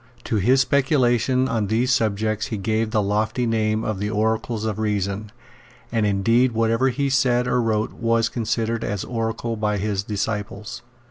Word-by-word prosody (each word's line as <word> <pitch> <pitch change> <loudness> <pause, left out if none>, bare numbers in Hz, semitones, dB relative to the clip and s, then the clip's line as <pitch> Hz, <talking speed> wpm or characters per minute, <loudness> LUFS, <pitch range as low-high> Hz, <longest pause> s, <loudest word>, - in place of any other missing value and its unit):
To 110 - -1
his 125 +7 +4
speculations 130 -2 +2
on 110 -4 -1
these 115 +5 +1
subjects 110 -1 0
he 110 - -4
gave 110 +2 0
the 110 -1 +1
lofty 110 +4 0
name 110 -1 0
of 110 -4 -2
the 105 +1 -2
Oracles 110 +1 -1
of 110 -1 -2
Reason; 105 -1 -2 0.6
and 110 -2 +1
indeed 115 +5 +2
whatever 115 +3 +2
he 140 +3 -1
said 125 -2 +2
or 125 0 +2
wrote 110 -1 0
was 115 -1 +1
considered 115 0 -2
as 100 -2 -2
oracular 115 0 -3
by 105 -1 -1
his 100 0 -1
disciples. 105 +1 -4
110 Hz, 160 wpm, -22 LUFS, 105-120 Hz, 0.6 s, his